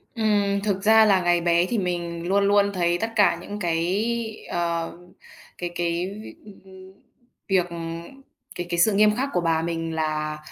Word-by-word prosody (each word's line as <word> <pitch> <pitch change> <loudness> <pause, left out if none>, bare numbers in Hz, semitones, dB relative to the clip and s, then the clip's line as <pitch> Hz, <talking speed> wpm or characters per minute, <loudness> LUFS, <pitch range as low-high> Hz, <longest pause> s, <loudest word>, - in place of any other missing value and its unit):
Ừm, 205 -3 +1
thực 195 -2 -1
ra 220 +1 +6
là 195 -3 +4
ngày 175 0 +2
bé 170 0 +3
thì 235 +5 -2
mình 175 -3 -3
luôn 200 +2 +2
luôn 200 0 +3
thấy 175 -2 +1
tất 225 - -1
cả 205 -5 +4
những 205 +3 -7
cái, 210 +7 -2
ờ, 170 -1 -2 0.7
cái 175 - -4
cái 170 +1 -1 0.2
việc, - - -11
ưm, 205 -2 -14
ưm, 190 0 -14 0.6
việc, 185 -3 +1
ừ 170 - -8 0.8
cái 175 0 -5
cái 170 -1 -1
sự 205 +5 +4
nghiêm 210 +1 +4
khắc 270 +4 -1
của 180 - +1
bà 165 -1 +1
mình 165 -1 -3
là 155 -1 -2
180 Hz, 185 wpm, -24 LUFS, 170-205 Hz, 0.8 s, ra